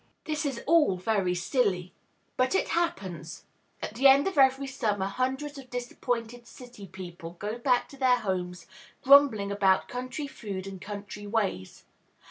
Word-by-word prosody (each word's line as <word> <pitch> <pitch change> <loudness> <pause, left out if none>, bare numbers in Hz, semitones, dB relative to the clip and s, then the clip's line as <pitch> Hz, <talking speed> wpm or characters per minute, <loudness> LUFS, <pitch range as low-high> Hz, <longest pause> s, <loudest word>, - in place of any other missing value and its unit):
This 305 -1 -2
is 265 -4 -4
all 300 - +4
very 185 -2 0
silly. 185 -3 0 0.4
But 255 +8 +1
it - - +1
happens. 190 - -3 0.4
At - - -4
the 260 +5 +5
end 275 +3 +6
of 385 - -2
every 270 -1 +4
summer 215 -7 -1
hundreds 265 +7 -2
of 260 -2 -13
disappointed 245 -1 -4
city 240 -6 -12
people 175 -2 -9
go 210 +5 -4
back 245 0 +2
to 275 - -13
their 255 -2 +4
homes 180 -5 -3 0.4
grumbling 265 -8 +6
about 195 -2 +2
country 255 +4 -5
food 200 -8 -6
and 195 -2 -8
country 205 0 -7
ways. 200 - -2
235 Hz, 150 wpm, -28 LUFS, 195-265 Hz, 0.4 s, end